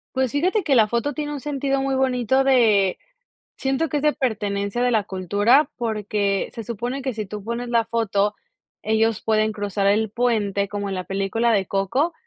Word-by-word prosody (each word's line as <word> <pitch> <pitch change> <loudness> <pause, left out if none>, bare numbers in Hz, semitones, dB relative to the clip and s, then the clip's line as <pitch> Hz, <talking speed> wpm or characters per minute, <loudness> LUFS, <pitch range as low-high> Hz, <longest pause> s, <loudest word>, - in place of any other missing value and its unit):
Pues, 260 -3 +1
fíjate 370 +8 +1
que 285 -5 +2
la 220 -3 +5
foto 235 +5 -1
tiene 295 -1 -4
un 285 - -6
sentido 275 -1 -1
muy 270 0 -1
bonito 260 0 +1
de, 215 -8 +4 0.6
siento 270 +4 -1
que 295 +1 -1
es - - -5
de 300 0 +3
pertenencia 205 -2 -2
de 250 - +2
la 220 -4 +2
cultura, 205 - +2
porque 210 -3 -1
se 230 - -7
supone 240 +5 -4
que 260 -2 -3
si 215 -2 -4
tú 205 0 -7
pones 235 +2 -4
la 230 -1 +2
foto, 210 -3 0 0.5
ellos 220 0 +1
pueden 215 0 +1
cruzar 205 -1 -2
el 210 +2 +2
puente, 210 -4 0
como 205 -1 -4
en 195 - -3
la 185 - -4
película 195 +4 0
de 195 -3 +1
Coco, 225 - 0
225 Hz, 190 wpm, -22 LUFS, 205-265 Hz, 0.6 s, la